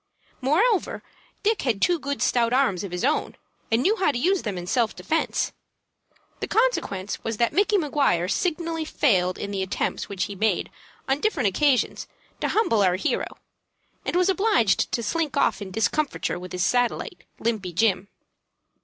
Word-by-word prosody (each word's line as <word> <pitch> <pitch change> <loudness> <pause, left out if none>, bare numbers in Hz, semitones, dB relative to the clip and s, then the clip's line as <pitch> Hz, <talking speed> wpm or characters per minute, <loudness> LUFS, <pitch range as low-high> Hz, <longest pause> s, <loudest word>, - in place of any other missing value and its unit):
Moreover, 370 - +1 0.4
Dick 435 0 +2
had 235 -7 0
two 350 - +2
good 280 0 -2
stout 235 -1 +2
arms 250 -9 +2
of 195 - -6
his 180 +6 -2
own, 300 +3 0 0.4
and 225 +3 +3
knew 415 +7 +3
how 370 -7 +2
to 240 - -3
use 370 +9 +2
them 205 -4 -4
in 175 - -5
self 230 +4 0
defence. 325 - -1 0.9
The - - -3
consequence 215 - 0
was 225 -1 -3
that 235 +1 +1
Micky 410 +2 +3
Maguire 280 - +1
signally 330 - -1
failed 185 -12 +1
in 200 - -5
the 195 -1 -2
attempts 190 0 -2
which 195 -2 -2
he 200 - -4
made 215 +3 0 0.4
on 270 +1 +1
different 300 - +1
occasions 260 +5 +1 0.3
to - - 0
humble 325 - +2
our 185 -2 +3
hero, 185 - -2 0.7
and - - -3
was 365 +1 +3
obliged 385 - +2
to 235 - -1
slink 310 +4 -1
off 210 - +2
in 200 - -5
discomfiture 225 +2 -1
with 180 0 -9
his 180 0 0
satellite, 245 +1 0
Limpy 215 -6 -2
Jim. 190 0 +1
245 Hz, 170 wpm, -24 LUFS, 200-325 Hz, 0.9 s, and